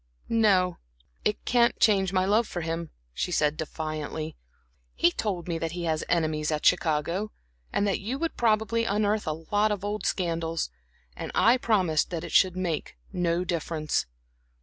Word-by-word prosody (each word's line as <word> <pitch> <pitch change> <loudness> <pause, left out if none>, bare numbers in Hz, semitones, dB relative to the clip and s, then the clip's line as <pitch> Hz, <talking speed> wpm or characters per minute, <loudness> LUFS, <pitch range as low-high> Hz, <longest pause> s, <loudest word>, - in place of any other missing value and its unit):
"No, 195 -6 +3 0.4
it 210 - -1
can't 240 -1 +3
change 195 -4 +4
my 185 -1 +2
love 215 +3 +3
for 175 - -4
him," 165 0 -3 0.2
she 180 - -2
said, 150 -2 +2
defiantly. 155 0 -4 0.6
"He 170 - +4
told 180 -3 -3
me 165 -2 -2
that 165 0 -3
he 175 0 -4
has 160 -2 0
enemies 155 -3 +1
at 150 -1 -2
Chicago, 170 +7 +2 0.4
and 200 - +1
that 200 - +1
you 235 +7 -3
would 330 +2 -2
probably 230 0 +2
unearth 210 -1 0
a 155 - +1 0.2
lot 210 +1 +3
of 205 -1 -2
old 210 +1 -2
scandals; 165 - -1 0.4
and - - -5
I 235 +3 +5
promised 185 - +2
that 170 -2 -4
it - - -6
should 185 -1 +4
make 170 - -3 0.2
no 175 0 +1
difference. 165 -3 -1
180 Hz, 165 wpm, -27 LUFS, 160-210 Hz, 0.6 s, I